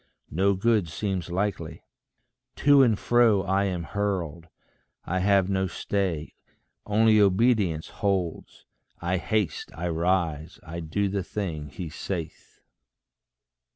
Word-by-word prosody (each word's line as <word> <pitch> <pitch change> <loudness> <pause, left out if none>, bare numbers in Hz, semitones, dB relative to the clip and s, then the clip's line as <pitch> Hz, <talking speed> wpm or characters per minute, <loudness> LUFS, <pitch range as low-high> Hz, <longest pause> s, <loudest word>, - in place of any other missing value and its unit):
No 95 +5 +2
good 105 -3 +2
seems 95 +1 -3
likely. 95 +3 -3 0.7
To 145 -1 +5
and 115 -6 +4
fro 115 -5 +3
I 95 +1 +1
am 90 -3 -2
hurled. 85 -4 -3 0.6
I 95 +2 -1
have 100 0 +3
no 95 -1 0
stay. 90 -3 -2 0.5
Only 110 +1 +4
obedience 100 -5 +2
holds: 95 -5 -3 0.3
I 90 +2 0
haste, 105 -3 -1
I 85 +1 -3
rise, 85 -2 -1
I 85 +1 -6
do 85 +5 -1
the 100 0 -1
thing 80 -9 -4
he 85 +5 -6
saith. 85 +1 -6
95 Hz, 120 wpm, -26 LUFS, 85-100 Hz, 0.7 s, To